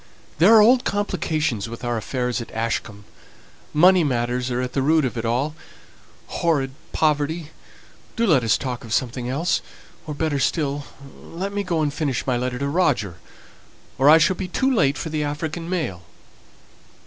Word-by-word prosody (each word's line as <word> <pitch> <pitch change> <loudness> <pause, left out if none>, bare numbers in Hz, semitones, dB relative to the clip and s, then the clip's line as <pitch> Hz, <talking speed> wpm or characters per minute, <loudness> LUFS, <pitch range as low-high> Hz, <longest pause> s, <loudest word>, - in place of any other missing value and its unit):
There 200 +8 +7
are 220 - +8
old 245 +3 +5
complications 155 - -1
with 115 +1 -9
our 120 -1 -1
affairs 125 +2 -2
at 115 - -8
Ashcombe. 110 -2 -3 0.7
Money 180 +3 +5
matters 125 -2 -1
are 125 0 -1
at 125 0 -3
the 135 - 0
root 155 +2 +3
of 125 - -3
it 115 -1 -3
all. 130 +6 0 0.7
Horrid 145 -6 0 0.2
poverty 155 +1 0 0.6
do 230 - +1
let 150 - +4
us 115 - +3
talk 125 -3 -5
of 115 -1 -5
something 125 0 -2
else! 150 +7 0 0.5
Or, 150 - -4
better 150 -2 -1
still, 145 -1 -1 0.4
let 190 +4 -6
me 205 - -1
go 170 -5 -1
and 145 -1 -1
finish 140 -6 -2
my 130 - +1
letter 125 +1 -2
to 140 +2 -2
Roger, 140 - 0 0.8
or 135 +2 +6
I 155 - +9
shall 165 +4 +3
be 185 0 -4
too 265 +9 +1
late 145 - +2
for 165 - -4
the 155 -1 -1
African 155 +3 -4
mail!" 155 - -2
145 Hz, 170 wpm, -22 LUFS, 125-165 Hz, 0.8 s, I